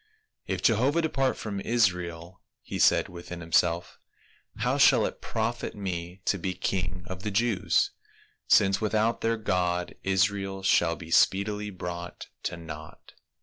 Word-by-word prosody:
" - - -57
If - - -3
Jehovah 130 +9 +3
depart 135 -4 0
from 100 -3 -4
Israel," 90 -6 -1 0.2
he - - -5
said - - +4
within 85 0 -8
himself, 85 +1 +1 0.3
" - - -35
how - - +1
shall - - +6
it - - -5
profit 115 +1 -3
me 90 -2 -5
to 100 - +1
be 95 +1 -3
king 90 -1 -2
of 95 0 -7
the 105 - -2
Jews, 105 -1 +1 0.6
since 95 0 +4
without 110 +2 +1
their 115 0 +1
God, 90 -4 -1
Israel 95 0 0
shall 85 -3 +3
be 85 -1 -11
speedily 105 +4 +2
brought 90 -2 -7 0.2
to 85 - -2
naught." 80 -2 -10
95 Hz, 150 wpm, -27 LUFS, 85-105 Hz, 0.6 s, shall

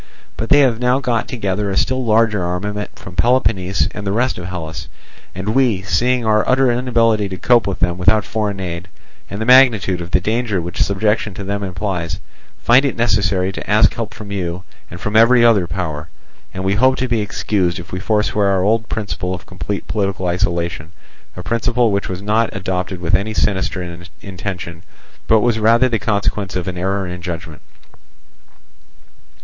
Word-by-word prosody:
But 115 - -4
they 145 - +6
have 120 -5 +2
now 125 +1 +2
got 120 -4 -1
together 100 -4 -2
a 95 - -2
still 130 0 +1
larger 110 -3 +2
armament 105 +4 -4
from 90 - -11
Peloponnese 100 -6 +2
and 105 - -7
the - - 0
rest 120 +1 0
of 90 - -7
Hellas; 80 -3 -6 0.5
and 95 +3 -4
we, 115 -5 +2
seeing 125 +4 +1
our 110 -1 +3
utter 130 -1 +4
inability 115 -4 +1
to 95 - -5
cope 120 +1 +3
with 95 - -2
them 90 0 0
without 105 +3 +3
foreign 105 -3 -2
aid, 90 -1 -5 0.4
and 100 - -6
the 110 - -2
magnitude 115 -8 +5
of 85 - -7
the 90 - +3
danger 110 +1 -1
which 85 0 -4
subjection 105 0 0
to 100 - -6
them 100 +1 -3
implies, 90 -3 -3 0.4
find 125 +3 +5
it 140 - -1
necessary 100 -5 +1
to 95 - -8
ask 105 +1 +4
help 115 -2 -4
from 105 -2 -9
you 90 -2 -3 0.3
and 85 - -9
from 105 +4 -4
every 120 +2 +6
other 105 -7 +4
power. 80 -3 -4 0.4
And 95 - -5
we 95 +1 +1
hope 130 +5 +3
to 130 - -1
be 115 -3 0
excused 100 -3 -1
if 85 -1 -9
we 90 - -3
forswear 105 0 +1
our 95 -2 +2
old 110 +2 +1
principle 90 -4 -3
of 90 - -11
complete 90 +3 -5
political 100 -3 -2
isolation, 85 -3 -2 0.4
a 90 - -6
principle 115 +3 +1
which 100 0 -1
was 95 +1 -5
not 110 +2 +1
adopted 95 -1 -3
with 85 -1 -2
any 110 +2 +1
sinister 90 -3 -1 0.2
intention, 90 -3 -6 0.5
but 110 -1 +4
was 115 -1 +1
rather 115 +4 +4
the 115 -3 -1
consequence 100 -3 -1
of 90 -1 -3
an 90 -1 -4
error 95 +2 -1
in 90 0 -6
judgment. 85 -3 -6
100 Hz, 185 wpm, -18 LUFS, 90-115 Hz, 0.5 s, they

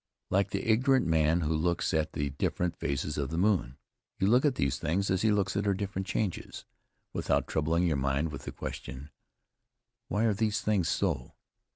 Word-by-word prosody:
Like 100 +1 +2
the 100 +4 -3
ignorant 130 +2 +4
man 80 +1 +3
who 80 0 0
looks 85 +2 0
at 80 0 0
the 70 -1 -2
different 85 +4 -1
phases 70 -2 -2
of 70 -2 -1
the 80 - -3
moon, 90 - +1 0.4
you - - +1
look 125 +7 +4
at 140 -3 +3
these 70 +1 0
things 90 +5 0
as 95 0 +1
he 110 - +3
looks 100 -2 +1
at 100 - 0
her 100 - +3
different 95 -1 -3
changes, 95 -1 -3 0.5
without - - +1
troubling 80 +3 +1
your 80 -4 +1
mind 70 +4 0
with 70 -1 -8
the - - -4
question, 65 +4 -7 1.0
"Why 105 - 0
are 110 -2 +3
these 105 +1 0
things 100 -6 +1
so?" 80 -10 -1
85 Hz, 190 wpm, -30 LUFS, 75-100 Hz, 1.0 s, ignorant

